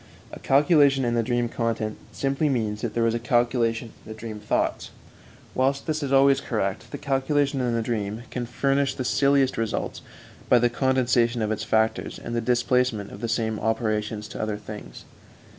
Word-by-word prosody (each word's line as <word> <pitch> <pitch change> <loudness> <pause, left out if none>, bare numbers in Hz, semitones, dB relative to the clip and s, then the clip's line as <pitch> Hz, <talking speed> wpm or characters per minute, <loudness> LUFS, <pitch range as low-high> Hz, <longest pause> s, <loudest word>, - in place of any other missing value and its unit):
A - - -7
calculation 140 -1 +4
in 120 - 0
the 120 - +2
dream 120 +1 0
content 115 -2 -2 0.2
simply 140 +2 0
means 110 -5 -1
that 115 - -3
there 115 - +2
was 115 0 +2
a 120 - -1
calculation 120 -1 +1
in - - -10
the 110 - -8
dream 110 -1 -7
thoughts; 105 - -1 0.6
whilst 135 +2 0
this 155 -1 -1
is 140 -2 -3
always 135 0 +5
correct, 100 -4 -2
the 145 - -6
calculation 140 0 0
in 120 -2 0
the 115 - 0
dream 110 -1 -3
can 120 -1 -3
furnish 135 +2 0
the 130 - -3
silliest 140 -1 +2
results 115 -1 -2 0.5
by 125 - +7
the 120 0 +2
condensation 125 -3 +2
of 105 - -1
its 110 - -2
factors 110 0 0
and 115 - -6
the 115 - 0
displacement 120 -3 +1
of 100 - -10
the 115 - -2
same 110 -2 -1
operations 110 -1 -1
to - - -6
other 110 -1 -2
things. 105 0 -10
120 Hz, 185 wpm, -25 LUFS, 110-135 Hz, 0.6 s, by